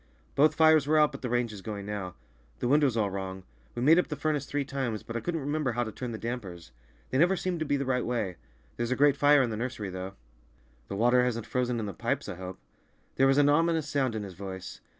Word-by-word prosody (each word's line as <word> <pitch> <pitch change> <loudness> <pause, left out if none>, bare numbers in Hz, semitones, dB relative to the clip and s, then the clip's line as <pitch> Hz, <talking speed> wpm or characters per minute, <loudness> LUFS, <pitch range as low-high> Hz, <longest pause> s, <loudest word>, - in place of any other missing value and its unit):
"Both 150 +2 +4
fires 155 -3 +5
were 155 +1 +3
out, 150 -1 +5
but 140 - -9
the 125 - -3
range 120 -2 0
is 100 - -9
going 100 -1 -6
now. 100 -4 -5 0.4
The 120 - -2
wind 145 +4 +4
was 130 -6 +2
all 105 -3 +1
wrong. 95 -1 -5 0.3
We 120 - -2
made 160 +5 +6
up - - +1
the 150 - -4
furnace 145 -1 -1
three 145 -1 -1
times, 130 -6 -3
but 115 - -8
I - - 0
couldn't 165 +7 -2
remember 145 -2 -1
how 120 +1 0
to 110 - -5
turn 125 +2 -5
the 110 - -4
dampers; 100 - -6 0.4
they 130 - +1
never 180 +4 +4
seemed 180 -2 -2
to 155 - -2
be 140 - +2
the 140 - -2
right 125 -2 0
way. 110 -7 -2 0.4
There's 120 0 -1
a 130 - +1
grate 145 0 +4
fire 145 -1 +5
in 120 - -1
the 110 - -3
nursery, 110 -4 -4
though." 95 +1 -6 0.7
"The 100 - -5
water 120 +4 +4
hasn't 115 -3 -1
frozen 125 -2 -1
in 110 - -3
the 100 - -5
pipes, - - -2
I - - -4
hope?" 95 0 -7 0.6
There 135 - +5
was 135 0 +3
an 145 -1 +5
ominous 160 +1 +2
sound 135 -5 0
in 110 - -3
his 95 -2 -8
voice. 95 0 -8
125 Hz, 255 wpm, -29 LUFS, 105-145 Hz, 0.7 s, made